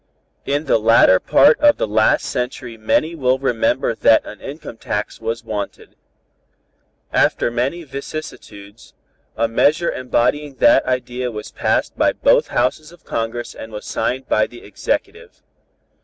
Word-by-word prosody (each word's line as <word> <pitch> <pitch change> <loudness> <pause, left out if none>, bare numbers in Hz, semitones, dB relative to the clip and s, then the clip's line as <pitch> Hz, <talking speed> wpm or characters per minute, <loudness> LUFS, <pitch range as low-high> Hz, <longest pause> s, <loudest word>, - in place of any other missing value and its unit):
In 145 +2 -1
the 130 - +2
latter 110 -4 +5
part 145 +3 +4
of 295 -1 +5
the - - 0
last 110 +1 +2
century 125 -1 -4
many 115 +9 0
will 130 -5 +1
remember 125 -2 0
that 110 0 +3
an 105 - -10
income 145 -4 -9
tax 105 +1 -4
was 115 +2 -3
wanted. 105 -3 -6 1.2
After - - +2
many 130 +9 -2
vicissitudes, 135 -8 -9 0.4
a 115 +1 +1
measure 150 +9 +2
embodying 130 +3 -1
that 295 - +4
idea 125 0 -2
was 105 -2 -8
passed - - -1
by - - +3
both - - +3
Houses 150 +6 -1
of 175 - -19
Congress 115 +1 -4
and 110 - -10
was 105 -1 -8
signed 130 +3 -2
by 110 - +2
the 120 - -14
Executive. 100 - -4
125 Hz, 140 wpm, -19 LUFS, 115-140 Hz, 1.2 s, latter